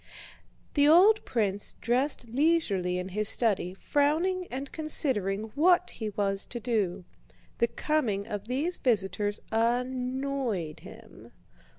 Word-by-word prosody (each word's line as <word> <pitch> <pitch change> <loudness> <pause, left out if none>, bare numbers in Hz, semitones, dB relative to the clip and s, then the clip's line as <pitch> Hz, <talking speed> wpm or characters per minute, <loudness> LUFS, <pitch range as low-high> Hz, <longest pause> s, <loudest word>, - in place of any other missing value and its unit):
The 290 -1 +4
old 390 +8 +6
prince 205 -4 -1
dressed 250 +3 0
leisurely 230 - +1
in 180 +1 -4
his 210 +2 0
study, 195 -6 +1
frowning 330 - 0
and 270 +2 -6
considering 220 -9 -1
what 350 +4 +3
he 220 -2 -5
was 195 -1 -1
to 240 - -6
do. 200 -6 -1 0.5
The 235 - +3
coming 230 -10 -1
of 210 -1 -6
these 290 +9 -1
visitors 205 -3 0
annoyed 250 - -1
him. - - -14
240 Hz, 115 wpm, -28 LUFS, 200-285 Hz, 0.5 s, old